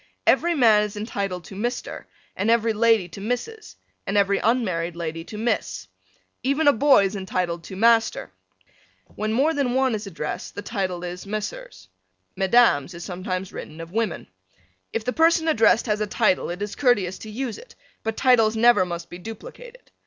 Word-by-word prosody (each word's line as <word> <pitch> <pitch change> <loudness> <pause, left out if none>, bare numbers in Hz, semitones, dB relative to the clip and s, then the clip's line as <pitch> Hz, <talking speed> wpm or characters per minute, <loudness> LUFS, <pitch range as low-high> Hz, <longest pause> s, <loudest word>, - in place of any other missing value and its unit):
Every 345 0 +3
man 225 -7 +5
is 210 0 -4
entitled 200 -4 -3
to 195 - -11
Mr. 240 +5 -4 0.3
and 205 +4 -1
every 230 -1 +3
lady 225 -3 +3
to 180 +5 -10
Mrs. 245 - -4 0.3
and 195 - 0
every 200 0 +3
unmarried 185 -8 0
lady 165 -1 -4
to 210 - -8
Miss. 95 - -2 0.5
Even 280 +5 +1
a 285 - +7
boy 265 -4 +5
is 195 +2 -3
entitled 180 -3 -2
to 190 - -8
Master. 230 +2 +2 0.8
When 215 +1 -2
more 275 +8 +2
than 270 -4 0
one 260 -2 +2
is 215 -1 -4
addressed 160 -5 -5
the 205 - -6
title 190 -5 -3
is 180 +2 -6
Messrs. 200 - -6 0.5
Mesdames 190 - +3
is 170 - -8
sometimes 185 0 -4
written 155 +1 -8
of 165 0 -8
women. 220 -3 -2 0.7
If 225 - -3
the 250 - -1
person 325 0 +3
addressed 225 -7 +4
has 210 -2 -1
a 210 - 0
title 215 -2 +1
it 180 +4 -4
is 205 -1 -5
courteous 205 -9 +1
to 220 - -9
use 235 +1 -4
it, - - -16 0.3
but 225 0 -3
titles 230 -4 +4
never 235 -4 +5
must 170 -1 -5
be 175 - -10
duplicated. 485 - -11
215 Hz, 175 wpm, -23 LUFS, 185-240 Hz, 0.8 s, a